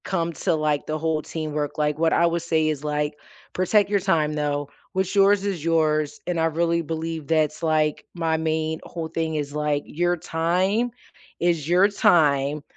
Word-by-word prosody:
Come 170 -3 -1
to, 165 - 0
like, 150 -2 -1
the 155 - -1
whole 160 0 -1
teamwork, 150 -2 -4
like, 150 0 0
what 165 0 +3
I 170 - +4
would 170 0 0
say 160 -2 +1
is, 150 -2 -3
like, 150 0 -2 0.3
"Protect 195 +3 +3
your 205 -1 +2
time, 165 -6 +1
though. 145 -1 -2 0.2
What's 190 0 -1
yours 200 0 +4
is 190 -7 -2
yours." 155 -2 +1
And 175 -2 -1
I 160 - +2
really 170 +1 +1
believe 160 -1 -4
that's, 155 -2 +1
like, 155 -2 +1
my 165 -2 0
main 160 0 -1
whole 165 -2 -6
thing 160 -1 -2
is, 145 -1 -3
like, 150 -1 0
your 175 +2 0
time 185 +9 0 0.5
is 170 -4 0
your 180 +3 +5
time, 150 -9 +2
160 Hz, 180 wpm, -24 LUFS, 150-170 Hz, 0.5 s, your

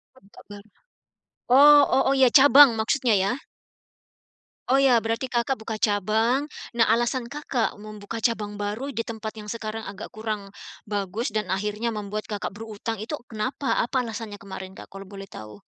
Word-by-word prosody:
Tempat 205 -6 -18
baru, 205 +1 -12 0.8
oh 290 +2 +8
oh 265 - +4
oh, - - +4
iya, 260 -2 +6
cabang 280 0 +8
maksudnya, 240 +1 +1
ya? 195 - +1 1.4
Oh, 265 - +5
iya, 260 -4 +4
berarti 230 +3 -2
Kakak 255 +1 -1
buka 220 0 -5
cabang. 220 +6 +1 0.3
Nah, 230 - +5
alasan 240 +2 0
Kakak 250 -4 -2
membuka 215 +1 -7
cabang 210 -3 -1
baru 220 +8 -4
di 230 - -1
tempat 220 -1 -6
yang 210 - -9
sekarang 225 0 -5
agak 200 - -9
kurang 215 -3 -5 0.3
bagus 205 +2 -3
dan 215 -4 -2
akhirnya 210 +4 -1
membuat 210 -1 -5
Kakak 205 -2 -4
berutang 220 0 -6
itu 270 +8 -4
kenapa? 255 +5 -2
Apa 250 +1 -1
alasannya 220 -2 -6
kemarin, 190 -1 -9
Kak, - - -10
kalau 195 0 -9
boleh 195 -1 -9
tahu? 105 - -11
220 Hz, 160 wpm, -25 LUFS, 205-245 Hz, 1.4 s, oh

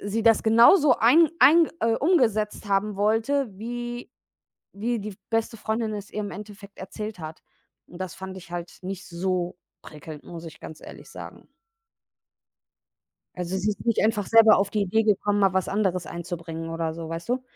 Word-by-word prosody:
sie 210 +2 -2
das 225 -1 +4
genauso 245 - +6
ein 310 +8 +5
ein 320 +5 +7
äh, 230 0 +2
umgesetzt 225 - +1
haben 200 +1 +1
wollte, 225 +6 +1
wie 240 +4 -6 0.7
wie 235 +2 -1
die 205 -1 -7
beste 225 0 -1
Freundin 220 0 -2
es 205 -1 -7
ihr - - -4
im 205 -1 -4
Endeffekt 205 -1 -11
erzählt 210 +2 -7
hat. 155 -1 -9 0.5
Und 175 - -12
das 185 -2 -5
fand 190 0 -8
ich 175 -2 -12
halt 175 0 -7
nicht 190 +1 -6
so 180 0 -2 0.3
prickelnd, 150 0 -11
muss 170 -1 -9
ich 160 - -11
ganz 155 - -10
ehrlich - - -12
sagen. - - -11 1.9
Also 180 +1 -3
sie 200 +3 0
ist 205 - -6
nicht 230 -2 +2
einfach 215 -2 +1
selber 225 0 +7
auf 200 +1 0
die 210 -2 0
Idee 210 +3 +1
gekommen, 205 -1 +1
mal 195 -2 +3
was 190 -1 0
anderes 190 -3 -1
einzubringen 165 -1 -6
oder 165 -1 -3
so, 165 -1 -7
weißt 165 +3 -6
du? 250 +1 -1
205 Hz, 175 wpm, -25 LUFS, 180-225 Hz, 1.9 s, ein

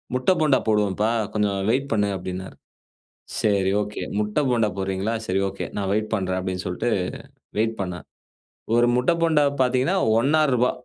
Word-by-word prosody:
முட்ட 130 +8 +2
போண்டா 145 -4 +4
போடுவோம்ப்பா, 105 0 +2 0.2
கொஞ்சம் 105 -2 0
வெயிட் 135 +4 +1
பண்ணு." 105 -2 +1
அப்டின்னாரு. 95 +1 -6 0.9
சரி, 100 -3 +2
ஓகே, 105 0 -5 0.2
முட்ட 105 +6 0
போண்டா 115 -3 +2
போடுறீங்களா? 95 +3 -1
சரி 95 0 0
ஓகே, 100 - -5
நான் 100 -1 -1
வெயிட் 110 +1 -1
பண்றேன் 95 -1 0
அப்படின்னு 95 0 -3
சொல்லிட்டு 90 +6 -2 0.7
வெயிட் 110 +1 +1
பண்ணா. 90 -2 -4 0.8
ஒரு 120 0 +4
முட்ட 125 +5 +2
போண்டா 160 -3 +4 0.2
பார்த்தீங்கன்னா 130 +8 +2 0.2
ரூ.1.50, 135 -2 +3
105 Hz, 145 wpm, -23 LUFS, 95-125 Hz, 0.9 s, போண்டா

